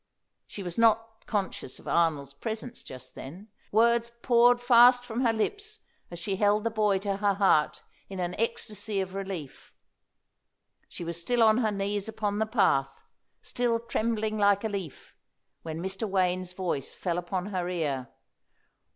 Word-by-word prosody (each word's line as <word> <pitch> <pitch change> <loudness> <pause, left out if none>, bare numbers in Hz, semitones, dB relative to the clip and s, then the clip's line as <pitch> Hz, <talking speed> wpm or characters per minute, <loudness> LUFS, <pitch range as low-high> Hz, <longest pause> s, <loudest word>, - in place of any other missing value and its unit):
She 200 - -7
was 175 +3 -5
not 225 0 +2
conscious 195 - -3
of - - -15
Arnold's 150 -5 +1
presence 220 - -5
just 130 -1 -10
then. 185 +11 -10 0.2
Words 235 +2 +3
poured 245 0 +5
fast 245 0 +6
from 235 +1 -3
her 235 - +4
lips 410 - -3 0.3
as 175 - -8
she 190 +3 -3
held 205 +1 +3
the 230 - 0
boy 210 -3 +2
to 195 0 -2
her 200 -1 +1
heart 190 -6 +2 0.3
in 190 -1 -6
an 180 0 -2
ecstasy 215 -2 -2
of 190 -1 -3
relief. 190 -7 -6 1.2
She - - -7
was 170 0 -4
still 240 +6 +2
on 220 +1 +5
her 220 -3 +2
knees 200 +1 -2
upon 210 -1 -2
the 220 - +1
path, 135 - +1 0.4
still 240 -2 0
trembling 220 -2 -1
like 200 0 +3
a 220 - -1
leaf, 195 -8 -7 0.5
when 160 0 -6
Mr. 195 +3 -3
Wayne's 185 -1 0
voice 180 -7 -3
fell 175 -2 -2
upon 180 +1 -3
her 180 -1 -1
ear. 140 -8 -2
200 Hz, 160 wpm, -28 LUFS, 180-225 Hz, 1.2 s, fast